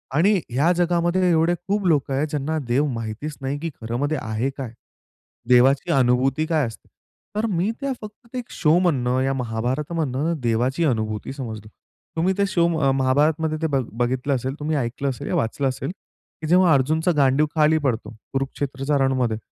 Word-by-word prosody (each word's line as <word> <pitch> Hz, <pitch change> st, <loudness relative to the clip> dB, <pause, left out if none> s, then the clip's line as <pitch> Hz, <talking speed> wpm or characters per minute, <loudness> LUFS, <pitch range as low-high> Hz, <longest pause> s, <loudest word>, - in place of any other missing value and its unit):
आणि 190 Hz, +7 st, +4 dB, 0.2 s
ह्या 145 Hz, +8 st, +2 dB
जगामध्ये 175 Hz, +1 st, +2 dB
एवढे 165 Hz, +2 st, +3 dB
खूप 200 Hz, 0 st, 0 dB
लोक 145 Hz, -4 st, +2 dB
आहेत 140 Hz, +3 st, 0 dB
ज्यांना 150 Hz, +2 st, -2 dB
देव 130 Hz, +5 st, +2 dB
माहितीच 115 Hz, +7 st, -5 dB
नाही 135 Hz, +2 st, -2 dB
की 165 Hz, -, -3 dB
खरं 115 Hz, +1 st, -4 dB
म्हणजे 145 Hz, +4 st, 0 dB
आहे 110 Hz, +4 st, -1 dB
काय? 130 Hz, -5 st, -5 dB, 0.8 s
देवाची 135 Hz, +7 st, +4 dB
अनुभूती 130 Hz, +3 st, +2 dB
काय 155 Hz, -4 st, +1 dB
असते? 115 Hz, -, -11 dB, 0.5 s
तर 215 Hz, +2 st, 0 dB
मी 180 Hz, +5 st, +1 dB
त्या 275 Hz, -, -1 dB
फक्त 220 Hz, +3 st, -12 dB
एक 245 Hz, -1 st, -5 dB
शोमधनं 150 Hz, -7 st, +2 dB
या 135 Hz, +1 st, +1 dB
महाभारतमधनं 135 Hz, +5 st, -1 dB
देवाची 125 Hz, +6 st, +1 dB
अनुभूती 110 Hz, -3 st, -1 dB
समजलो. 110 Hz, -6 st, -7 dB, 0.5 s
तुम्ही 175 Hz, +4 st, +2 dB
ते 200 Hz, -, +3 dB
शो 175 Hz, -3 st, +2 dB
अ, 135 Hz, -3 st, +3 dB
महाभारतमध्ये 150 Hz, +4 st, +2 dB
ते 160 Hz, -, +1 dB
बघ 135 Hz, -4 st, 0 dB
बघितलं 130 Hz, +3 st, 0 dB
असेल, 130 Hz, +1 st, -2 dB
तुम्ही 155 Hz, +1 st, -1 dB
ऐकलं 135 Hz, +2 st, -2 dB
असेल, 125 Hz, -, -5 dB
या -, -, -1 dB
वाचलं 135 Hz, +5 st, 0 dB
असेल, 130 Hz, +5 st, -4 dB
की 160 Hz, -4 st, -13 dB
जेव्हा 175 Hz, 0 st, +5 dB
अर्जुनचा 155 Hz, +6 st, +2 dB
गांडीव 140 Hz, +1 st, +4 dB
खाली 155 Hz, 0 st, +4 dB
पडतो, 120 Hz, -3 st, -1 dB, 0.2 s
कुरुक्षेत्रच्या 135 Hz, +1 st, -1 dB
रणमध्ये, 125 Hz, -4 st, 0 dB
140 Hz, 165 wpm, -23 LUFS, 125-160 Hz, 0.8 s, जेव्हा